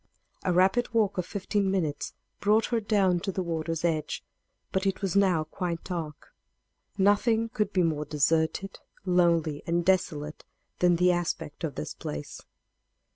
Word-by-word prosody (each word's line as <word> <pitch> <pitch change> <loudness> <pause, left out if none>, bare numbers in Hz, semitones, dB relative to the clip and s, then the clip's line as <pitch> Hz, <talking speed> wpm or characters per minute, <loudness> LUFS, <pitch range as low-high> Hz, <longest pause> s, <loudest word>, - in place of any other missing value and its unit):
A 185 - +1
rapid 190 +7 +2
walk 205 -4 +2
of 180 - -2
fifteen 200 0 -1
minutes 170 -7 -2 0.2
brought 215 +2 +3
her 230 - +3
down 200 -4 +2
to 195 +3 -3
the 185 0 -2
water's 165 -1 -2
edge. 155 -3 -1 0.5
But 190 +1 0
it 195 +1 -2
was 195 -2 -1
now 185 -5 +4
quite 170 +1 -4
dark. 160 -5 -6 0.6
Nothing 220 +3 +3
could 210 -3 -1
be 185 -3 +2
more 155 -2 0
deserted, 160 +6 0 0.3
lonely 170 -5 +2
and 170 0 +1
desolate 155 -5 0 0.4
than 175 -1 +4
the 180 +1 +4
aspect 170 -3 -3
of 155 -5 -3
this 75 - -4
place. 75 0 -6
180 Hz, 150 wpm, -28 LUFS, 160-195 Hz, 0.6 s, now